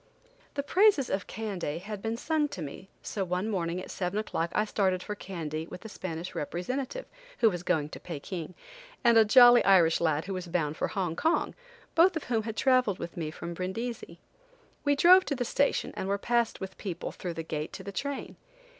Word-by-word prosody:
The 280 - -1
praises 365 - +4
of 195 +1 -2
Kandy 195 -8 -4
had 200 +3 -6
been 225 +1 -2
sung 310 +3 +1
to 190 - -7
me, 155 +7 -9
so 200 - -2
one 180 +3 -1
morning 175 -4 -1
at 185 - -8
seven 180 +2 -2
o'clock 170 -5 -1
I 210 - +3
started 190 -3 0
for 210 - -4
Kandy 160 -6 -5
with 180 - -9
the 220 - -9
Spanish 175 -3 -6
representative, 255 - -3 0.3
who 225 -2 +4
was 175 -2 -4
going 160 -4 0
to - - -9
Pekin, 170 +1 -6 0.5
and 235 -1 +5
a 225 - +8
jolly 240 +2 +8
Irish 175 -5 +5
lad 160 -2 +1
who 195 - -4
was 185 -1 -5
bound 165 -3 -1
for - - -1
Hong 180 -4 -2
Kong, 320 - +1 0.4
both 345 +2 +5
of 320 - -2
whom 230 -3 0
had 220 0 -6
traveled 255 -7 +3
with 170 - -7
me 160 -3 -3
from 170 +2 -6
Brindisi. 190 +1 -5 0.7
We 285 0 +3
drove 365 +5 +7
to 285 - -1
the 245 -1 -2
station 280 +4 +1
and 190 - -3
were 200 +1 +1
passed 235 +2 0
with 190 0 -5
the - - -24
people, 185 -5 -5
through 175 -2 -6
the 165 - -4
gate 155 -1 -4
to 190 - -7
the 200 - -6
train. 280 +7 -4
195 Hz, 210 wpm, -29 LUFS, 170-240 Hz, 0.7 s, a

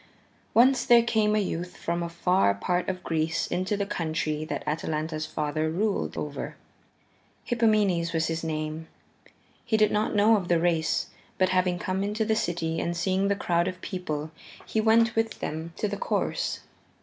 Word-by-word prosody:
Once 255 +2 +5
there 240 -2 +6
came 215 -2 +2
a - - +3
youth 180 -2 -3
from 170 +1 -2
a 170 - -3
far 170 - +2
part 180 - -1
of 185 -1 -4
Greece 165 +1 0
into 185 +3 -1
the 200 - -1
country 155 -4 -2
that - - -4
Atalanta's 155 0 -2
father 155 +1 -1
ruled 200 +5 -1
over. 145 -1 -4 0.9
Hippomenes 210 -8 +2
was 165 -1 +1
his 165 0 -2
name. 155 0 -3 0.8
He 220 -2 +1
did 215 -1 +4
not 210 +1 0
know 215 +2 +5
of 185 -4 -4
the 170 -1 +3
race, 165 -2 +1 0.3
but 185 -1 +3
having 185 -1 +2
come 185 +2 -2
into 210 +2 -1
the 220 0 +2
city 165 -5 -1
and 170 0 -2
seeing 190 +2 +1
the 200 - +2
crowd 170 -3 +1
of 185 -1 -4
people, 155 -4 -4 0.3
he 220 - 0
went 230 +1 +4
with 225 0 0
them 160 +2 -4
to 210 - 0
the 205 0 -3
course. - - -1
180 Hz, 175 wpm, -27 LUFS, 160-210 Hz, 0.9 s, there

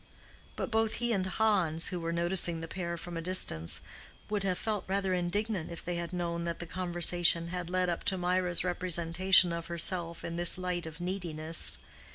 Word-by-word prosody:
But - - -4
both 220 0 +1
he 240 0 0
and 190 -3 -1
Hans, 190 -6 +1
who 180 - -4
were 165 0 -3
noticing 170 0 +2
the 165 - -6
pair 170 0 -4
from 170 0 -7
a - - -3
distance, 160 - +1 0.5
would 210 -1 0
have 190 -2 0
felt 215 -3 -2
rather 190 0 0
indignant 185 +1 -2
if 170 - -9
they 175 - -2
had 170 0 -4
known 170 -1 -3
that 170 -1 -3
the 175 - -6
conversation 175 -1 +1
had 180 -1 -5
led 185 0 0
up 170 -1 -2
to 190 - +1
Mirah's 180 -1 +2
representation 180 0 +3
of 170 0 -5
herself 170 0 -1
in 170 0 -5
this 175 0 +5
light 180 -2 -3
of 160 +2 -10
neediness. 165 - +1
175 Hz, 190 wpm, -30 LUFS, 170-185 Hz, 0.5 s, this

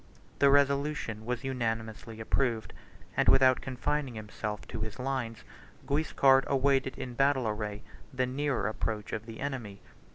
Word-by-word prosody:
The 140 - +6
resolution 140 -5 +2
was 125 +1 -2
unanimously 115 -3 -3
approved; 115 0 0 0.4
and, - - +4
without 130 -1 +6
confining 130 0 -2
himself 105 0 -5
to - - -5
his 110 0 -4
lines, 125 -3 -3 0.4
Guiscard 140 -2 +4
awaited 135 -1 +2
in 125 - -5
battle 135 -1 +2
array 105 -1 -3 0.3
the 130 -1 0
nearer 135 -1 -1
approach 110 0 -3
of 110 +1 -4
the 115 -1 -8
enemy. 120 -8 -4
125 Hz, 135 wpm, -30 LUFS, 110-135 Hz, 0.4 s, The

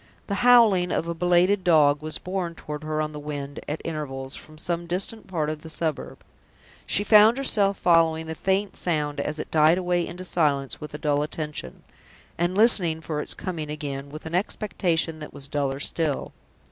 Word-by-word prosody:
The 200 -1 -2
howling 230 -8 +6
of 165 - -1
a 170 - -1
belated 180 +3 +3
dog 150 -4 +4
was 155 0 -4
borne 180 -2 -4
toward 150 -1 -7
her 155 0 -1
on 155 - -4
the 150 - -7
wind, 145 -1 -6
at 150 +2 -4
intervals, 135 -4 -5
from 155 0 -10
some 170 +1 -3
distant 195 +5 -3
part 165 -5 -1
of 155 0 -4
the 160 - -10
suburb. 160 -2 -4 0.6
She 205 - +2
found 215 +3 +6
herself 205 -7 +1
following 165 -2 +3
the 160 - -4
faint 190 +4 -1
sound 150 -4 -2
as 150 +1 -2
it - - -6
died 155 +2 +5
away 175 -1 0
into 180 +1 -7
silence 145 -6 0
with 150 0 -7
a - - -3
dull 145 -1 +1
attention, 150 - -5 0.5
and 175 +2 -1
listening 185 -8 +5
for 155 -2 -3
its - - -5
coming 165 -5 -5
again 140 -2 -5
with 155 +2 -10
an 160 - -6
expectation 175 -4 -1
that 150 - -9
was 140 - -7
duller 140 -2 -2
still. 155 -1 -2
160 Hz, 185 wpm, -25 LUFS, 150-180 Hz, 0.6 s, howling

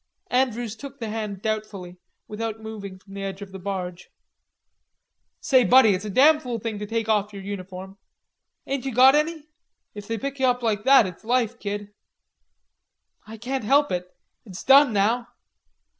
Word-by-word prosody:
Andrews 245 -3 0
took 280 +5 -10
the 225 -2 -4
hand 210 -3 -5
doubtfully, 210 -5 -4 0.3
without 220 +1 -5
moving 210 -3 -8
from 195 +1 -17
the 200 - -6
edge 195 0 -5
of 195 - -12
the 190 - -8
barge. 180 -2 -5 1.3
"Say, 260 -4 +3
Buddy, 240 +1 +6
it's 185 +2 -3
a - - -4
damn 295 +9 +5
fool 250 -5 -4
thing 220 -1 -5
to 210 - -5
take 225 0 -2
off 210 -1 +1
your 195 -1 -8
uniform. 190 0 -8 0.7
Ain't 275 -1 -3
you 265 -4 -4
got 260 +2 +7
any? 305 +1 0 0.5
If 205 -1 -9
they 225 - -2
pick 275 +5 -5
you 260 - +3
up 250 0 0
like 210 -1 -1
that 265 -4 +7
it's 180 +1 -8
life, 240 0 0
kid." 205 0 -5 1.3
"I 220 +1 -9
can't 255 +3 -4
help 285 +6 +3
it. 180 0 -3 0.3
It's 195 -6 -10
done 275 0 +6
now." 220 +4 +1
220 Hz, 175 wpm, -24 LUFS, 200-250 Hz, 1.3 s, got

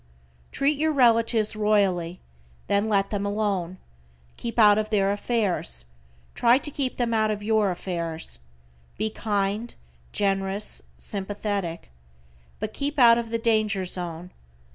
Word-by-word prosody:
Treat 280 +1 +1
your 315 +1 +2
relatives 230 -4 +3
royally, 195 -5 +1 0.4
then 200 +2 +1
let 195 -2 +1
them 205 -2 -1
alone. 200 -4 -1 0.6
Keep 235 0 -6
out 210 -2 +6
of 215 0 -2
their 200 -2 +2
affairs, 200 - -2 0.5
try 240 +1 +4
to 295 +2 -3
keep 270 -2 -3
them 235 -2 0
out 215 -1 +2
of 210 -1 -3
your 215 -1 +2
affairs. 170 - -4 0.6
Be 215 +1 -1
kind, 210 +2 -2 0.4
generous, 195 0 -1 0.2
sympathetic. 200 - -4 0.7
But 215 - -4
keep 290 +1 -3
out 235 -2 +7
of 230 -1 -5
the 230 - 0
danger 215 -4 +1
zone. 175 -1 -3
210 Hz, 130 wpm, -25 LUFS, 195-230 Hz, 0.7 s, out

